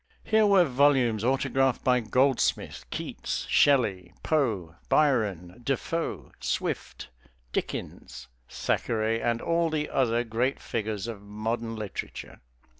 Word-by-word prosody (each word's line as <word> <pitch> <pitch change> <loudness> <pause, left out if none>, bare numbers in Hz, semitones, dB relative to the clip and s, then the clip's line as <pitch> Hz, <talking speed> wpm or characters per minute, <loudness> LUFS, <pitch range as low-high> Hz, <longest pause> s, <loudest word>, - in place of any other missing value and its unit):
Here 220 -1 +4
were 195 -3 +6
volumes 130 -5 +3
autographed 135 0 +1
by 125 -1 +4
Goldsmith, 125 +3 +1
Keats, - - -4
Shelley, 100 -11 +3
Poe, 110 - 0
Byron, 110 - +1
DeFoe, 150 +6 -2
Swift, - - -3 0.4
Dickens, - - -5 0.2
Thackeray, 115 0 0
and 115 0 0
all 170 0 +1
the 150 -1 -2
other 120 -2 +2
great 120 +4 -1
figures 110 -3 -3
of 115 -4 -6
modern 115 +3 -3
literature. 105 -4 -6
120 Hz, 110 wpm, -27 LUFS, 110-140 Hz, 0.4 s, were